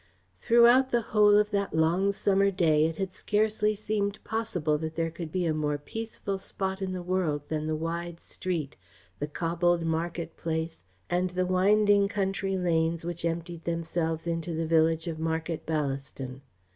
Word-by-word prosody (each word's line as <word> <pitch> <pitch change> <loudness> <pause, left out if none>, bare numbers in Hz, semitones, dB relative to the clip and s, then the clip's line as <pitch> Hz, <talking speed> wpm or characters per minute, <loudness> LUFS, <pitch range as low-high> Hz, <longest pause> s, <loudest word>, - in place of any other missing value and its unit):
Throughout 240 - +5
the 240 -2 +1
whole 210 -1 +6
of 210 0 +2
that 200 -4 -1
long 170 +5 +3
summer 200 0 +2
day 160 -5 +3
it 165 -1 -5
had 190 -1 -3
scarcely 215 +1 +1
seemed 205 0 -1
possible 175 -9 -1
that 160 0 -4
there 165 0 -1
could 165 -1 -7
be 180 0 0
a 160 - +1
more 150 -1 0
peaceful 200 +3 -5
spot 190 0 -3
in 190 -1 -2
the 180 -1 -4
world 175 -5 0
than 155 -1 -2
the 155 - 0
wide 170 +1 -4
street, 170 -7 -3 0.4
the 145 - -2
cobbled 170 +2 0
market 165 0 -2
place, 160 - -3 0.2
and 180 +1 0
the 180 +1 -1
winding 200 +2 +4
country 195 -1 -1
lanes 165 -2 0
which 170 -1 -4
emptied 170 0 -3
themselves 165 -1 -2
into 165 0 -2
the 165 +1 -1
village 160 0 +2
of 160 -2 -4
Market 160 0 -2
Ballaston. 135 -3 -3
170 Hz, 165 wpm, -28 LUFS, 160-195 Hz, 0.4 s, whole